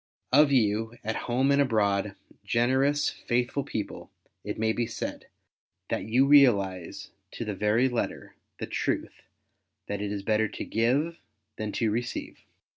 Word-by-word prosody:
Of 145 Hz, +1 st, +6 dB
you, 115 Hz, -2 st, +1 dB
at 110 Hz, +1 st, -2 dB
home 130 Hz, +3 st, +2 dB
and 140 Hz, 0 st, +4 dB
abroad, 105 Hz, -5 st, +1 dB, 0.3 s
generous, 130 Hz, +5 st, +2 dB
faithful 125 Hz, +3 st, -1 dB
people, 105 Hz, -5 st, -5 dB, 0.3 s
it -, -, -4 dB
may 110 Hz, 0 st, +1 dB
be 120 Hz, 0 st, -1 dB
said, 115 Hz, -, -5 dB, 0.6 s
that -, -, -2 dB
you 120 Hz, +5 st, +3 dB
realize 100 Hz, -, +3 dB, 0.2 s
to 115 Hz, -, -5 dB
the 105 Hz, -, -3 dB
very 105 Hz, +6 st, +2 dB
letter 120 Hz, -2 st, -3 dB, 0.2 s
the -, -, -4 dB
truth -, -, -3 dB, 0.6 s
that 100 Hz, 0 st, -4 dB
it 105 Hz, -1 st, -3 dB
is 100 Hz, -1 st, -4 dB
better 110 Hz, +1 st, +2 dB
to -, -, -6 dB
give 135 Hz, +9 st, 0 dB, 0.4 s
than 110 Hz, -1 st, -3 dB
to 110 Hz, -2 st, 0 dB
receive. 120 Hz, +3 st, -4 dB
115 Hz, 145 wpm, -27 LUFS, 105-130 Hz, 0.6 s, Of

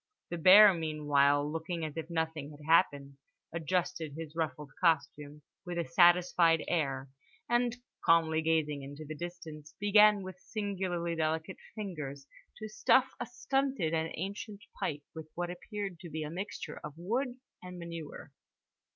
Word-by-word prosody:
The 175 Hz, -, -3 dB
bear 195 Hz, +4 st, +9 dB
meanwhile, 145 Hz, -3 st, +2 dB
looking 160 Hz, +2 st, -3 dB
as 155 Hz, -1 st, -6 dB
if 160 Hz, 0 st, -5 dB
nothing 160 Hz, -3 st, -2 dB
had 150 Hz, 0 st, -13 dB
happened, 145 Hz, -4 st, +2 dB, 0.4 s
adjusted 165 Hz, -2 st, -2 dB
his 160 Hz, -1 st, -7 dB
ruffled 150 Hz, -3 st, -3 dB
costume 150 Hz, -3 st, 0 dB, 0.2 s
with 175 Hz, -2 st, -5 dB
a 170 Hz, -, 0 dB
satisfied 175 Hz, -1 st, +4 dB
air 135 Hz, -5 st, -1 dB, 0.4 s
and 240 Hz, 0 st, +1 dB, 0.3 s
(calmly 160 Hz, -1 st, +4 dB
gazing 155 Hz, -3 st, 0 dB
into 145 Hz, +3 st, -9 dB
the 155 Hz, -, -6 dB
distance) 160 Hz, -2 st, -8 dB
began 210 Hz, 0 st, +5 dB
with 185 Hz, -1 st, -9 dB
singularly 185 Hz, -6 st, -3 dB
delicate 160 Hz, +3 st, -1 dB, 0.2 s
fingers 150 Hz, -10 st, -6 dB, 0.3 s
to 215 Hz, -, -6 dB
stuff 255 Hz, +4 st, +3 dB
a -, -, -4 dB
stunted 260 Hz, -, -1 dB
and 160 Hz, 0 st, 0 dB
ancient 200 Hz, +3 st, -6 dB, 0.2 s
pipe 145 Hz, -1 st, -2 dB
with 160 Hz, -1 st, -9 dB
what 175 Hz, 0 st, -2 dB
appeared 195 Hz, 0 st, -6 dB
to 170 Hz, -, -9 dB
be 155 Hz, 0 st, -4 dB
a 150 Hz, -, -5 dB
mixture 190 Hz, +5 st, -6 dB
of 150 Hz, -1 st, -7 dB
wood 245 Hz, +8 st, -2 dB, 0.2 s
and 180 Hz, 0 st, -9 dB
manure. 170 Hz, -4 st, -8 dB
165 Hz, 145 wpm, -31 LUFS, 150-185 Hz, 0.4 s, bear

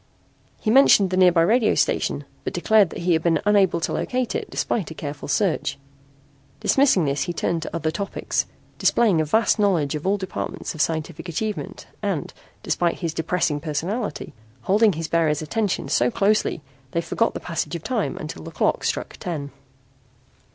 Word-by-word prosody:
He 215 Hz, -, 0 dB
mentioned 215 Hz, -7 st, +6 dB
the -, -, +1 dB
nearby 180 Hz, -3 st, +5 dB
radio 220 Hz, +5 st, +3 dB
station -, -, 0 dB, 0.2 s
but -, -, -4 dB
declared 215 Hz, -5 st, +4 dB
that -, -, -7 dB
he 175 Hz, 0 st, +3 dB
had 160 Hz, -, +2 dB
been 165 Hz, 0 st, +2 dB
unable 200 Hz, -4 st, +3 dB
to -, -, -1 dB
locate 250 Hz, -2 st, -1 dB
it -, -, -3 dB
despite 200 Hz, -9 st, -2 dB
a 160 Hz, -, -8 dB
careful 145 Hz, -1 st, -6 dB
search. 165 Hz, -9 st, 0 dB, 0.8 s
Dismissing 260 Hz, -, +3 dB
this 140 Hz, 0 st, 0 dB
he 175 Hz, -, -3 dB
turned 170 Hz, 0 st, -1 dB
to 165 Hz, -, -6 dB
other 160 Hz, -1 st, -1 dB
topics, 200 Hz, +4 st, -2 dB, 0.3 s
displaying 205 Hz, -9 st, +3 dB
a -, -, 0 dB
vast 220 Hz, +7 st, +2 dB
knowledge 175 Hz, -9 st, +2 dB
of 150 Hz, +4 st, -4 dB
all 200 Hz, +1 st, +2 dB
departments 190 Hz, -1 st, -5 dB
of 155 Hz, -, -3 dB
scientific 160 Hz, +2 st, -2 dB
achievement 210 Hz, +6 st, -4 dB, 0.2 s
and, -, -, -2 dB, 0.3 s
despite 170 Hz, -1 st, 0 dB
his 165 Hz, -3 st, -2 dB
depressing 160 Hz, -2 st, 0 dB
personality, 170 Hz, +9 st, -3 dB, 0.3 s
holding 210 Hz, +1 st, +4 dB
his 165 Hz, 0 st, -4 dB
bearer's 160 Hz, -3 st, +1 dB
attention 205 Hz, +4 st, -1 dB
so 120 Hz, -, +2 dB
closely 200 Hz, -, +1 dB, 0.3 s
they 170 Hz, -, +1 dB
forgot 230 Hz, +6 st, 0 dB
the -, -, -3 dB
passage 170 Hz, 0 st, -3 dB
of 165 Hz, -, -6 dB
time 240 Hz, -6 st, -1 dB
until 155 Hz, -, -7 dB
the -, -, -8 dB
clock -, -, 0 dB
struck -, -, -2 dB
ten. 145 Hz, -5 st, -5 dB
175 Hz, 170 wpm, -23 LUFS, 160-210 Hz, 0.8 s, mentioned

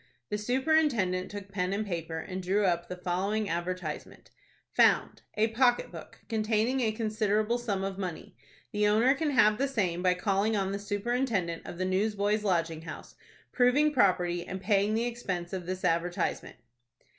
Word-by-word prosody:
The 210 Hz, -, 0 dB
superintendent 245 Hz, -7 st, +1 dB
took 205 Hz, -1 st, -8 dB
pen 180 Hz, -1 st, -1 dB
and 210 Hz, +2 st, -1 dB
paper, 165 Hz, -4 st, -4 dB
and 185 Hz, +3 st, -5 dB
drew 195 Hz, +3 st, +1 dB
up 175 Hz, -1 st, 0 dB
the 180 Hz, -, -5 dB
following 195 Hz, +4 st, -1 dB
advertisement:— 175 Hz, -2 st, -5 dB, 0.4 s
"FOUND.—A 220 Hz, +1 st, +2 dB
pocket 245 Hz, +1 st, +2 dB
book, -, -, -11 dB
containing 220 Hz, +3 st, +1 dB
a 225 Hz, -3 st, +2 dB
considerable 215 Hz, +1 st, 0 dB
sum 205 Hz, -5 st, -2 dB
of 195 Hz, 0 st, -4 dB
money. 180 Hz, -4 st, -6 dB, 0.4 s
The 210 Hz, 0 st, +2 dB
owner 225 Hz, +6 st, +4 dB
can 300 Hz, +2 st, -1 dB
have 215 Hz, -5 st, +4 dB
the 275 Hz, -, +2 dB
same 190 Hz, -10 st, -1 dB
by 180 Hz, 0 st, +3 dB
calling 200 Hz, +3 st, +1 dB
on 195 Hz, -1 st, -1 dB
the 200 Hz, -, -3 dB
Superintendent 205 Hz, -4 st, -1 dB
of 175 Hz, -, -7 dB
the 185 Hz, -, -1 dB
Newsboys' 205 Hz, +2 st, 0 dB
Lodging 165 Hz, -5 st, 0 dB
House, 160 Hz, -1 st, -9 dB, 0.4 s
proving 275 Hz, +5 st, +3 dB
property, 180 Hz, -7 st, +2 dB
and 190 Hz, +2 st, -6 dB
paying 200 Hz, +2 st, +2 dB
the 230 Hz, +1 st, +1 dB
expense 190 Hz, -8 st, -4 dB
of 180 Hz, -2 st, -4 dB
this 185 Hz, 0 st, -3 dB
advertisement." 170 Hz, +1 st, -1 dB
200 Hz, 160 wpm, -29 LUFS, 180-225 Hz, 0.4 s, owner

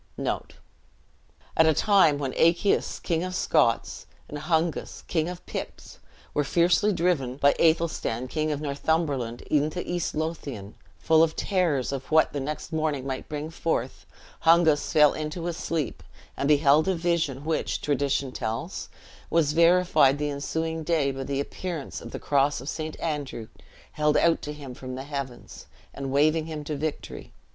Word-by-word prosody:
At 160 Hz, -, +5 dB
a 160 Hz, -, +4 dB
time 190 Hz, -8 st, +4 dB
when 135 Hz, -3 st, -3 dB
Achaius 170 Hz, +5 st, +2 dB
King 165 Hz, -1 st, -1 dB
of 185 Hz, 0 st, -4 dB
Scotts, 150 Hz, -10 st, +1 dB, 0.2 s
and 150 Hz, -, -6 dB
Hungus 160 Hz, 0 st, -1 dB
King 160 Hz, -1 st, 0 dB
of 180 Hz, 0 st, -8 dB
Picts, -, -, -7 dB, 0.3 s
were 150 Hz, -, +1 dB
fiercely 175 Hz, +7 st, +3 dB
driven 165 Hz, -9 st, 0 dB
by 140 Hz, 0 st, +4 dB
Athelstan 160 Hz, -7 st, +1 dB
King 155 Hz, +3 st, -1 dB
of 145 Hz, 0 st, -3 dB
Northumberland 140 Hz, -4 st, -1 dB
into 155 Hz, +4 st, 0 dB
East 175 Hz, -1 st, -2 dB
Lothian, 145 Hz, -10 st, -4 dB, 0.2 s
full 160 Hz, -1 st, +4 dB
of 165 Hz, -1 st, +2 dB
terrors 170 Hz, -, 0 dB
of 135 Hz, -1 st, -5 dB
what 160 Hz, 0 st, +4 dB
the 145 Hz, -, -2 dB
next 150 Hz, +4 st, -5 dB
morning 155 Hz, -4 st, -1 dB
might 130 Hz, -1 st, -5 dB
bring 150 Hz, +1 st, -4 dB
forth, 160 Hz, -6 st, -3 dB, 0.3 s
Hungus 165 Hz, -2 st, +4 dB
fell 150 Hz, -1 st, +6 dB
into 155 Hz, +2 st, -4 dB
a 175 Hz, -, -1 dB
sleep, 165 Hz, -2 st, -3 dB, 0.3 s
and 140 Hz, -, -1 dB
beheld 150 Hz, +2 st, +4 dB
a 190 Hz, -, +2 dB
vision, 165 Hz, -5 st, -1 dB
which, 160 Hz, 0 st, -1 dB
tradition 140 Hz, -2 st, 0 dB
tells, 110 Hz, -2 st, -4 dB, 0.4 s
was 155 Hz, -3 st, +2 dB
verified 170 Hz, -4 st, +4 dB
the 150 Hz, 0 st, -2 dB
ensuing 160 Hz, +3 st, -3 dB
day 155 Hz, -4 st, +1 dB
by 135 Hz, 0 st, -5 dB
the 140 Hz, 0 st, -2 dB
appearance 165 Hz, +1 st, -5 dB
of -, -, -8 dB
the -, -, -6 dB
cross 145 Hz, -1 st, +1 dB
of 135 Hz, -, -9 dB
St. 155 Hz, 0 st, -5 dB
Andrew 145 Hz, -8 st, -4 dB, 0.4 s
held 150 Hz, 0 st, +2 dB
out 170 Hz, -1 st, +3 dB
to 150 Hz, -, -5 dB
him 145 Hz, -4 st, -8 dB
from 130 Hz, 0 st, -7 dB
the 130 Hz, -, -5 dB
heavens, 140 Hz, -4 st, -7 dB, 0.3 s
and 135 Hz, -1 st, -5 dB
waving 155 Hz, +3 st, +2 dB
him 155 Hz, -2 st, -5 dB
to 150 Hz, +1 st, -4 dB
victory. 150 Hz, +1 st, -5 dB
150 Hz, 160 wpm, -26 LUFS, 140-165 Hz, 0.4 s, fell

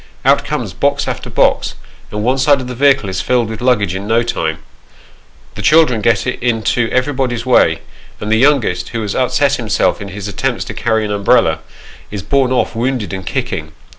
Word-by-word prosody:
Out -, -, +4 dB
comes -, -, -4 dB
box -, -, 0 dB
after -, -, -4 dB
box, -, -, +1 dB, 0.3 s
and 105 Hz, 0 st, -4 dB
one 130 Hz, +3 st, +1 dB
side 140 Hz, +1 st, +4 dB
of 130 Hz, -, -5 dB
the 125 Hz, -, -5 dB
vehicle 135 Hz, -3 st, +3 dB
is 95 Hz, -, -2 dB
filled 120 Hz, -3 st, +1 dB
with 110 Hz, -, -7 dB
luggage 110 Hz, -8 st, +1 dB
in 95 Hz, +2 st, -5 dB
no 115 Hz, +2 st, +2 dB
time; 80 Hz, -9 st, -2 dB, 1.0 s
the -, -, -7 dB
children 155 Hz, -8 st, +4 dB
get 110 Hz, -1 st, +2 dB
into 120 Hz, -2 st, 0 dB
everybody's 130 Hz, -3 st, -1 dB
way, 130 Hz, -, +3 dB, 0.4 s
and 105 Hz, -, -4 dB
the 110 Hz, -, +4 dB
youngest, 130 Hz, -8 st, +2 dB
who 115 Hz, -1 st, -3 dB
has 105 Hz, -1 st, -3 dB
upset 140 Hz, +2 st, +1 dB
himself 110 Hz, -4 st, 0 dB
in 100 Hz, -, -6 dB
his 100 Hz, +1 st, -6 dB
attempts 100 Hz, -, -2 dB
to -, -, -6 dB
carry 110 Hz, -2 st, 0 dB
an 105 Hz, -, -4 dB
umbrella, 100 Hz, -5 st, +2 dB, 0.5 s
is 100 Hz, -3 st, -6 dB
borne 135 Hz, -2 st, +1 dB
off 130 Hz, -, 0 dB
wounded 120 Hz, -3 st, -2 dB
and 95 Hz, -1 st, -6 dB
kicking. 80 Hz, 0 st, -3 dB
115 Hz, 190 wpm, -16 LUFS, 105-130 Hz, 1.0 s, Out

